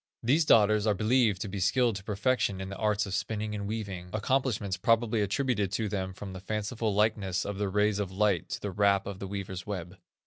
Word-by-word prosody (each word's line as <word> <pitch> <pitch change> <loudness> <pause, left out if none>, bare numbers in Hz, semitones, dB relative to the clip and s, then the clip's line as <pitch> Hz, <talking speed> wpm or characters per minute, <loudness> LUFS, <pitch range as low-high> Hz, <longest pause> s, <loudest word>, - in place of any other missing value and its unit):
These 145 +7 +3
daughters 105 -3 +5
are 105 - +3
believed 110 -1 +2
to - - -2
be 100 0 -5
skilled 115 +5 +2
to 95 - -10
perfection 105 -1 0
in 95 0 -5
the 100 - -6
arts 105 -1 +1
of 100 - -6
spinning 105 +1 -2
and 100 -1 -4
weaving, 100 -5 -5
accomplishments 110 -3 0
probably 115 0 +2
attributed 105 -1 0
to 110 +1 0
them 95 -2 -3
from 95 0 -8
the 95 - -7
fanciful 105 +3 -2
likeness 100 -3 +1
of 100 -1 -4
the 100 -1 0
rays 105 +1 +2
of 100 -3 -2
light 100 -3 +1
to - - -4
the 100 - -3
warp 100 0 +2
of 100 -1 -6
the 100 - -5
weaver's 95 -1 -5
web. 95 -2 -5
105 Hz, 215 wpm, -29 LUFS, 95-110 Hz, -, daughters